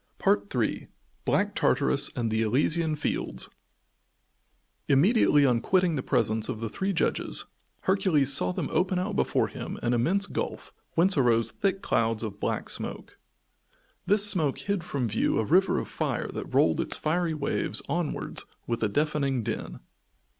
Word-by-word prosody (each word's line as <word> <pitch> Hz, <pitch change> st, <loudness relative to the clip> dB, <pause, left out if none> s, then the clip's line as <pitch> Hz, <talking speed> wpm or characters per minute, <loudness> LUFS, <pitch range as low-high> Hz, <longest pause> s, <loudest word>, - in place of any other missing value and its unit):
III 100 Hz, 0 st, 0 dB, 0.4 s
BLACK -, -, +1 dB
TARTARUS -, -, +2 dB
AND 115 Hz, -2 st, -1 dB
THE 110 Hz, 0 st, +1 dB
ELYSIAN 150 Hz, +8 st, +1 dB
FIELDS 150 Hz, -, -3 dB, 1.4 s
Immediately 150 Hz, -, +4 dB
on 120 Hz, -3 st, +2 dB
quitting 180 Hz, +1 st, +2 dB
the 140 Hz, -, -1 dB
presence 110 Hz, -3 st, 0 dB
of 110 Hz, -, -3 dB
the 115 Hz, -1 st, -4 dB
three 190 Hz, -, -2 dB
judges, 175 Hz, -, 0 dB, 0.4 s
Hercules 185 Hz, -8 st, +2 dB
saw 90 Hz, -9 st, +4 dB
them -, -, -3 dB
open 185 Hz, 0 st, +1 dB
out 195 Hz, +3 st, -2 dB
before -, -, +1 dB
him -, -, -7 dB
an 120 Hz, -, +1 dB
immense 175 Hz, +12 st, +2 dB
gulf -, -, -5 dB, 0.2 s
whence 175 Hz, -1 st, +3 dB
arose 115 Hz, -3 st, +3 dB
thick 195 Hz, -1 st, -1 dB
clouds 115 Hz, -1 st, 0 dB
of 105 Hz, -2 st, -6 dB
black -, -, -2 dB
smoke. -, -, -5 dB, 0.9 s
This 205 Hz, 0 st, +5 dB
smoke 160 Hz, -9 st, +1 dB
hid 200 Hz, -4 st, -2 dB
from 140 Hz, -7 st, -2 dB
view 110 Hz, 0 st, 0 dB
a 110 Hz, -, +1 dB
river 185 Hz, -, +3 dB
of -, -, -3 dB
fire -, -, -3 dB
that -, -, -6 dB
rolled 80 Hz, -2 st, +3 dB
its -, -, -1 dB
fiery 165 Hz, +1 st, 0 dB
waves 140 Hz, -2 st, -1 dB
onwards 170 Hz, -3 st, -3 dB, 0.2 s
with 115 Hz, -1 st, -3 dB
a 110 Hz, -, +1 dB
deafening 140 Hz, -1 st, 0 dB
din. -, -, -5 dB
145 Hz, 155 wpm, -27 LUFS, 115-180 Hz, 1.4 s, This